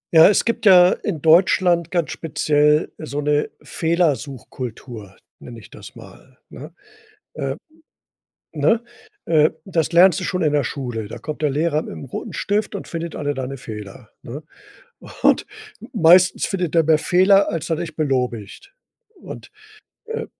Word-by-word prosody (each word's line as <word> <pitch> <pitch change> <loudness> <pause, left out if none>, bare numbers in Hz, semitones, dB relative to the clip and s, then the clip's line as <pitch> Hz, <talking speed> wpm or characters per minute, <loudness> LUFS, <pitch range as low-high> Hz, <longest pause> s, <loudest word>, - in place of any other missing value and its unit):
Ja, 160 0 +9
es 210 - +2
gibt 230 -2 -1
ja 180 -1 +7
in 170 -10 -4
Deutschland 170 0 +3
ganz 170 -3 -1
speziell 150 -1 +1
so 145 -2 -5
'ne 150 0 0
Fehlersuchkultur, 130 - -3 0.2
nenne 120 -2 -11
ich - - -16
das - - -13
mal, 130 -1 -16
ne? 150 +5 -11 0.6
Äh, - - -4 1.0
ne? 230 0 +1 0.4
Äh, 155 -1 +3
das 170 -5 -1
lernst 175 +1 +5
du 185 - -4
schon 180 -2 -2
in 150 - +1
der 145 -1 +2
Schule. 120 -4 -5
Da - - -8
kommt 155 0 -7
der 150 - +2
Lehrer 155 +2 0
mit - - -9
'nem 80 - -9
roten - - -7
Stift 205 +1 -2
und - - -8
findet 165 -1 -6
alle 145 -1 -2
deine 135 +1 -5
Fehler, 105 -1 -10
ne? 145 +6 -9 0.8
Und - - +3 0.5
meistens 180 -1 +4
findet 180 -4 -3
er 165 - +4
mehr 155 0 +3
Fehler, 190 +4 +3
als 165 0 -4
er 160 - 0
dich 160 -2 -6
belobigt. 130 - -3 0.4
Und, 365 - -11 0.6
äh, 455 +1 -5
155 Hz, 155 wpm, -20 LUFS, 135-180 Hz, 1.0 s, Ja